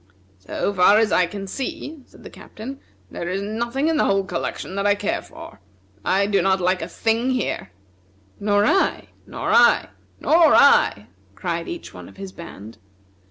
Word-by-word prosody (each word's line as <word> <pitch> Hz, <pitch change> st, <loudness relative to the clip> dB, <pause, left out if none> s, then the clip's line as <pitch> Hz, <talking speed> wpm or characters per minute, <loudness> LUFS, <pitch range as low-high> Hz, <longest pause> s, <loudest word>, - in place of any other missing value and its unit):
"So 95 Hz, -, -3 dB
far 195 Hz, +2 st, +5 dB
as 220 Hz, -1 st, +2 dB
I 180 Hz, -, +3 dB
can 195 Hz, +2 st, -7 dB
see," 275 Hz, +7 st, -6 dB
said -, -, -18 dB
the -, -, -11 dB
Captain, 260 Hz, +6 st, -10 dB, 0.3 s
"there 170 Hz, -, -5 dB
is 195 Hz, +2 st, -2 dB
nothing 235 Hz, +7 st, -2 dB
in 325 Hz, -1 st, +1 dB
the -, -, +2 dB
whole 195 Hz, 0 st, +2 dB
collection 190 Hz, -, -5 dB
that 200 Hz, +1 st, 0 dB
I 205 Hz, -, +4 dB
care -, -, -2 dB
for. -, -, -13 dB, 0.4 s
I 195 Hz, -, +2 dB
do 200 Hz, -1 st, +1 dB
not 190 Hz, 0 st, +2 dB
like 185 Hz, +1 st, +1 dB
a 165 Hz, -, -4 dB
thing 225 Hz, +7 st, 0 dB
here!" 250 Hz, -, -2 dB, 0.7 s
"Nor 205 Hz, 0 st, +2 dB
I!" 385 Hz, -, +1 dB, 0.2 s
"Nor -, -, -3 dB
I!" -, -, +5 dB, 0.3 s
"Nor 325 Hz, -1 st, +5 dB
I!" 105 Hz, -, +5 dB, 0.3 s
cried 170 Hz, -2 st, -3 dB
each 345 Hz, -1 st, -7 dB
one -, -, -11 dB
of -, -, -18 dB
his 195 Hz, -1 st, -8 dB
band. 115 Hz, -, -11 dB
200 Hz, 175 wpm, -22 LUFS, 185-240 Hz, 0.7 s, far